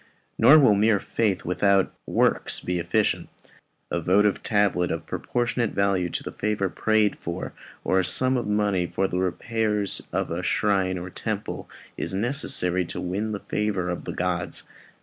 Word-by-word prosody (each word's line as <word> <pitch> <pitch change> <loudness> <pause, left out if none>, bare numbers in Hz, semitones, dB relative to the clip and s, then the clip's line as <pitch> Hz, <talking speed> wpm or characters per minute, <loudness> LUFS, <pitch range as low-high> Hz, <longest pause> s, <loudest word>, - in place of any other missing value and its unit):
Nor 125 +7 +8
will 135 -8 +6
mere 105 0 +3
faith 100 -4 -1
without 95 +2 +2
works - - +1
be 90 0 -2
efficient. 85 - 0 0.6
A 85 - -1
votive 100 +4 +3
tablet 100 -4 +1
of 80 0 -3
proportionate 120 +2 -1
value 100 -3 +1
to - - -4
the - - -6
favour 105 -2 -1
prayed 110 0 +1
for, 85 +2 -6 0.3
or 95 - +2
a - - +2
sum 130 +9 +2
of 120 -4 -1
money 105 -4 +1
for 95 +2 0
the 90 - -2
repairs 105 +2 -1
of - - -1
the 85 +2 -3
shrine 95 0 +1
or 90 +1 -6
temple, - - -4 0.3
is 95 - -3
necessary 95 -6 +1
to - - -6
win 100 +5 -2
the 105 - -3
favour 100 -4 -2
of 90 - -5
the - - -4
gods. - - -2
100 Hz, 165 wpm, -25 LUFS, 90-105 Hz, 0.6 s, Nor